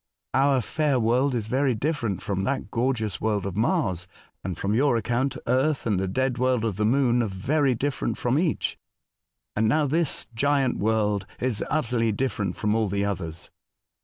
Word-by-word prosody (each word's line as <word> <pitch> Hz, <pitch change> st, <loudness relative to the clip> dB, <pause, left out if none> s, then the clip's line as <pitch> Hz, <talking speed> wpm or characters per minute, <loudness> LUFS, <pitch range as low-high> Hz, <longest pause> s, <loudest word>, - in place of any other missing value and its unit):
Our 135 Hz, -1 st, +3 dB
fair 145 Hz, +2 st, 0 dB
world 125 Hz, +4 st, +2 dB
is 110 Hz, -3 st, -2 dB
very 130 Hz, +1 st, +1 dB
different 115 Hz, -, -2 dB
from 95 Hz, -1 st, -2 dB
that 130 Hz, -2 st, -2 dB
gorgeous 115 Hz, -3 st, -1 dB
world 105 Hz, -3 st, 0 dB
of 95 Hz, -3 st, -4 dB
Mars; 105 Hz, -, 0 dB, 0.4 s
and, 90 Hz, -3 st, -4 dB
from 100 Hz, +4 st, -1 dB
your 130 Hz, +1 st, +3 dB
account, 120 Hz, +4 st, -1 dB
Earth, 130 Hz, +4 st, +1 dB
and 105 Hz, -5 st, +1 dB
the 95 Hz, -, -1 dB
dead 125 Hz, +5 st, -1 dB
world 125 Hz, -3 st, +2 dB
of 105 Hz, -5 st, -2 dB
the 105 Hz, -, +1 dB
Moon 120 Hz, 0 st, +3 dB
are 115 Hz, -, 0 dB
very 130 Hz, +8 st, +1 dB
different 140 Hz, +3 st, -2 dB
from 125 Hz, +4 st, +1 dB
each; 170 Hz, -3 st, -1 dB, 0.8 s
and 110 Hz, +1 st, +2 dB
now 150 Hz, +6 st, +3 dB
this 155 Hz, +2 st, 0 dB
giant 135 Hz, +2 st, +1 dB
world 105 Hz, -2 st, +1 dB
is 120 Hz, -4 st, 0 dB
utterly 120 Hz, -6 st, +1 dB
different 105 Hz, -5 st, -2 dB
from 105 Hz, 0 st, 0 dB
all 110 Hz, -1 st, +1 dB
the 100 Hz, +1 st, 0 dB
others." 85 Hz, -5 st, -4 dB
120 Hz, 175 wpm, -25 LUFS, 105-135 Hz, 0.8 s, Our